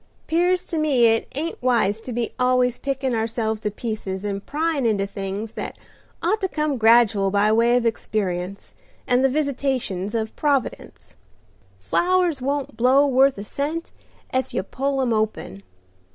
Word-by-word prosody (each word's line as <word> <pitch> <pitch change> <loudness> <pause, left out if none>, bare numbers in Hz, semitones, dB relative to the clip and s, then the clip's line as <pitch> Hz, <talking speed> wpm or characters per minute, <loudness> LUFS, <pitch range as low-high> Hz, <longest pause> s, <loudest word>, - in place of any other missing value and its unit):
'Pears 355 +2 +1
to 330 - -3
me 280 -6 +3
it 225 0 +3
ain't 320 +4 -4
wise 230 -5 +2
to 250 - -8
be 235 -1 -2
always 250 -1 +2
pickin' 270 -2 -2
ourselves 220 -1 -1
to 210 - -1
pieces 210 -3 -5
and 200 -1 -3
pryin' 310 -1 0
into 210 -4 +1
things 200 +2 -5
that - - -6 0.5
ought 420 +6 +1
to 380 - +1
come 305 -5 -1
gradual 225 -3 +5
by 205 +2 +2
way 235 +2 +4
of 240 - -1
experience 195 -4 -2 0.3
and 250 +1 +2
the 270 - +4
visitations 260 -8 -1
of 220 -1 -2
Providence. 260 - -2 0.6
Flowers 345 - +1
won't 280 +1 -2
blow 260 +4 +4
worth 270 -1 +3
a 200 - -5
cent 300 +9 -4 0.4
ef 260 0 -1
you 185 - 0
pull 270 +6 -2
'em 240 -3 +1
open. 215 - -2
245 Hz, 155 wpm, -23 LUFS, 215-280 Hz, 0.6 s, gradual